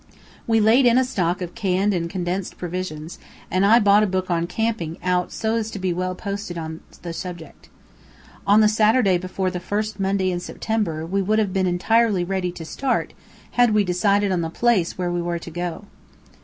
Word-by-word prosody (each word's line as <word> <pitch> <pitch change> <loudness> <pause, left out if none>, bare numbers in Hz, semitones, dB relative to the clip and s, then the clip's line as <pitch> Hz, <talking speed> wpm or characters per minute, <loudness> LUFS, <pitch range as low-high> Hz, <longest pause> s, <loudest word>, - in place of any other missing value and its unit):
We 225 -1 +3
laid 230 +5 +5
in 240 +1 +5
a 260 - +5
stock 185 -8 -1
of 175 - -7
canned 200 -2 +1
and 170 -2 -2
condensed 180 +1 -3
provisions, 175 -3 -5 0.3
and 185 +1 +2
I 215 +4 +6
bought 205 -1 +5
a 215 - +2
book 185 -1 -2
on 170 0 0
camping 180 -5 -2
out 180 -1 0
so 220 +1 -1
as 225 -1 -2
to 215 - -7
be 185 -2 -1
well 185 +1 -2
posted 200 -2 -5
on 160 -1 -5 0.2
the 170 -1 -5
subject. 175 -2 -8 0.8
On 205 +2 +6
the 215 - +6
Saturday 215 -3 +3
before 185 +1 -2
the 180 - -4
first 210 +2 -3
Monday 190 -1 +1
in 175 - -2
September 175 -5 -2
we 195 +4 0
would 210 +3 +1
have 205 -4 +1
been 190 -1 +1
entirely 200 +2 +2
ready 180 0 -2
to 165 -2 -9
start 265 +10 -1 0.4
had 245 -3 +3
we 210 - +4
decided 200 +2 +2
on 180 -2 +1
the 165 - -2
place 205 -2 +1
where 180 -1 -1
we 175 0 -1
were 170 0 -2
to 170 0 -9
go. 175 +3 -4
185 Hz, 200 wpm, -22 LUFS, 175-215 Hz, 0.8 s, I